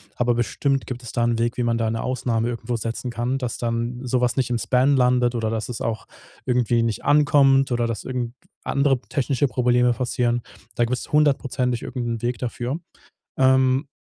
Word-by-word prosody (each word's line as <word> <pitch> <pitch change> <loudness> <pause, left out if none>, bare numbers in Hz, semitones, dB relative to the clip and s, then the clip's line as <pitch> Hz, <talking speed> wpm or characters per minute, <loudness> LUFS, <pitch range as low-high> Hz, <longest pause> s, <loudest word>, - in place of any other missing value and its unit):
aber 120 0 +1
bestimmt 135 +3 -1
gibt 125 -1 -6
es 115 - -7
da 120 - 0
'n 120 -1 +1
Weg, 120 +1 -1
wie 125 - 0
man 115 -1 +1
da 115 -1 0
'ne 115 0 -2
Ausnahme 120 -2 -1
irgendwo 120 0 -3
setzen 115 +2 -4
kann, 120 +3 -1
dass 125 -3 -4
dann 120 +1 -2
so 125 0 0
was 125 -1 +1
nicht 130 -2 0
im 120 - 0
Spam 130 +4 +2
landet 125 -1 +3
oder 110 -1 -1
dass 110 +1 -3
es 120 - -5
auch 115 -1 -3 0.4
irgendwie 120 -2 +2
nicht 115 -2 -2
ankommt 140 -2 +4
oder 120 -1 +1
dass 115 -4 -3
irgend 125 -2 -3 0.3
andere 140 -2 +1
technische 135 0 0
Probleme 125 -1 +2
passieren. 120 -1 0 0.3
Da 120 - +1
gibt's 125 +1 -4
hundertprozentig 135 -5 +1
irgend 125 -2 -4
'n 115 -1 -3
Weg 120 +1 -1
dafür. 125 +4 -3 0.6
Ähm, 130 +1 +3
125 Hz, 195 wpm, -23 LUFS, 120-130 Hz, 0.6 s, ankommt